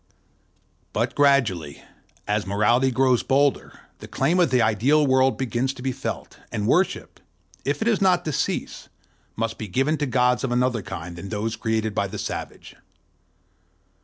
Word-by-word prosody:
But - - -1
gradually, 115 - +1 0.4
as 105 -1 -1
morality 115 +6 +2
grows 130 -1 +2
bolder, 140 +1 0 0.2
the - - -10
claim 180 +3 +1
of 175 - +4
the 130 -1 +2
ideal 120 +7 +3
world 130 -3 +3
begins 130 +1 -1
to 125 - -10
be 135 - 0
felt; 135 +2 -6
and 105 - -2
worship, 180 - 0 0.5
if - - -1
it - - -2
is 220 -4 +2
not 180 -2 +3
to 155 - -1
cease, - - -3 0.5
must 115 0 -3
be 110 - -5
given 135 - 0
to 145 - 0
gods 125 0 +2
of 130 - -1
another 125 -2 +1
kind 85 -1 -7
than 95 +3 -7
those 110 +1 -2
created 110 -1 -1
by 100 -1 0
the 105 +2 -7
savage. - - -6
125 Hz, 165 wpm, -23 LUFS, 110-135 Hz, 0.5 s, of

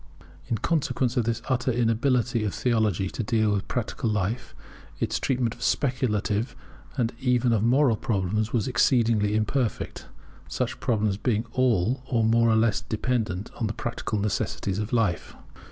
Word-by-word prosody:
In 115 - 0
consequence 130 -2 0
of 120 - +1
this 115 0 -2
utter 130 0 +1
inability 120 0 +1
of 105 - -2
theology 110 -6 +1
to - - -4
deal 110 -1 +1
with 100 -1 -1
practical 120 -1 -2
life, 105 -5 -2 0.4
its - - -1
treatment 125 -4 0
of 120 - -16
speculative 120 -6 0 0.4
and 120 -2 0
even 125 -2 +2
of 110 - +2
moral 125 +1 +4
problems 105 +1 -1
was 115 -5 0
exceedingly 115 -4 +2
imperfect, 110 +3 -1 0.4
such - - -3
problems 105 -4 0
being 110 0 0
all 125 -1 +1 0.2
more 115 +1 +4
or 110 - +4
less 110 -2 +2
dependent 110 -4 -2
on 115 - 0
the 105 - -3
practical 115 -1 -3
necessities 100 -1 -1
of 105 +1 -3
life. 110 -8 0
115 Hz, 150 wpm, -26 LUFS, 105-125 Hz, 0.4 s, moral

